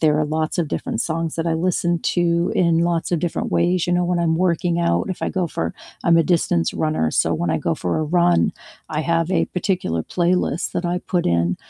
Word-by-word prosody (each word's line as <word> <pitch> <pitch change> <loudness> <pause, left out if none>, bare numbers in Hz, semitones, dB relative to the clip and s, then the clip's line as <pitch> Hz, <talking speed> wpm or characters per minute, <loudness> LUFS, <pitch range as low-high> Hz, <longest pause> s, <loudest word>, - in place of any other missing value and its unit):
there 150 -1 +3
are 155 - +2
lots 155 +3 -2
of 165 - 0
different 230 - -3
songs 165 0 -2
that 165 0 -2
I 165 - +1
listen 175 0 0 0.2
to 170 0 +1
in 170 -2 +3
lots 170 0 0
of 175 - +1
different 170 +1 -2
ways. 175 0 +1
You 175 - +1
know, 180 - +2
when 175 0 0
I'm 165 -1 +1
working 175 -1 +1
out, 170 +2 +1
if 185 - -5
I - - 0
go 185 -2 -1
for 80 - -3 0.3
I'm 170 0 +5
a - - +5
distance 150 - +1
runner, 155 - 0
so, - - +1
when 85 - -1
I 80 - +1
go 80 +1 -1
for 90 +1 -2
a 155 - 0
run, 175 +2 +2 0.4
I 150 - -1
have 165 +1 0
a 190 - +2
particular 175 - -1
playlist 175 - 0
that 175 - -2
I 175 +1 0
put 180 -1 -2
in 85 +1 +1
170 Hz, 230 wpm, -21 LUFS, 155-175 Hz, 0.4 s, I'm